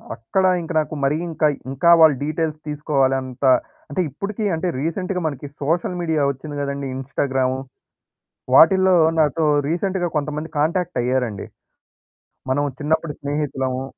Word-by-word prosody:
అక్కడ 115 +12 -1 0.2
ఇంక 165 - -7
నాకు 155 0 -3
మరీ 140 +3 +2
ఇంకయి 155 -2 +1 0.2
ఇంకా 145 +6 +2
వాళ్ళు 155 -3 +7
డీటెయిల్స్ 155 0 -2
తీసుకోవాలంట. 135 -3 -1 0.5
అంటే, 165 +6 -1
ఇప్పుడికి 200 - -5
అంటే, 170 +3 -2
రీసెంట్‌గా 180 +4 -2
మనకి 145 -1 -5
సోషల్ 170 +4 0
మీడియా 160 -4 +1
ఒచ్చింది 145 +2 -8
గదండీ! 140 0 -3
ఇన్‌స్టాగ్రాము. 130 -1 -1 1.0
వాటిల్లో 190 +4 +6 0.2
నాతో 155 +1 +2 0.2
రీసెంట్‌గా 180 +1 -1
కొంతమంది 150 +2 -3
కాంటాక్ట్ 170 +3 0
అయ్యారండి. 125 -5 -1 1.0
మనం 145 +2 +1 0.2
చిన్నప్పుడు 160 +1 -1
స్నేహితులము 135 -3 -2
150 Hz, 120 wpm, -21 LUFS, 135-165 Hz, 1.0 s, వాళ్ళు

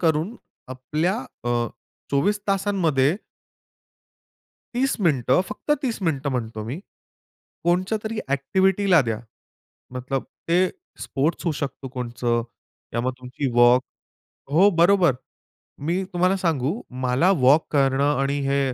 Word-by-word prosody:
करून 165 +6 +1 0.3
आपल्या 150 - -1 0.3
अ, 120 - -1 0.6
24 205 +10 +1
तासांमध्ये 180 -7 +2 1.6
30 265 +3 +1
मिनिटं, 140 - +3
फक्त - - -7
30 245 -5 -1
मिनिटं 145 -5 0
म्हणतो 115 -3 -3
मी. 125 +9 -5 0.9
कोनत्यातरी 210 +6 0
अ‍ॅक्टिव्हिटीला 190 +5 +2
द्या. 110 - -1 0.8
मतलब 130 +1 -3 0.2
ते 170 - +3 0.4
स्पोर्ट्स 150 +6 -1
होऊ 165 - +1
शकतो 140 -2 -5
कोणतं 120 -2 -2 0.5
किंवा 115 +1 -2
मग 130 - +1
तुमची 130 +2 -4
वॉक 120 +1 +6 0.7
हो, 185 +7 +6
बरोबर. 175 -2 +5 0.7
मी 170 +6 -1
तुम्हाला 180 +2 +2
सांगू 165 - -1 0.2
मला 130 +9 +3
वॉक 140 +5 +5
करणं 135 -1 +3 0.2
आणि 140 +1 0
हे 140 +1 +2
150 Hz, 110 wpm, -23 LUFS, 130-185 Hz, 1.6 s, वॉक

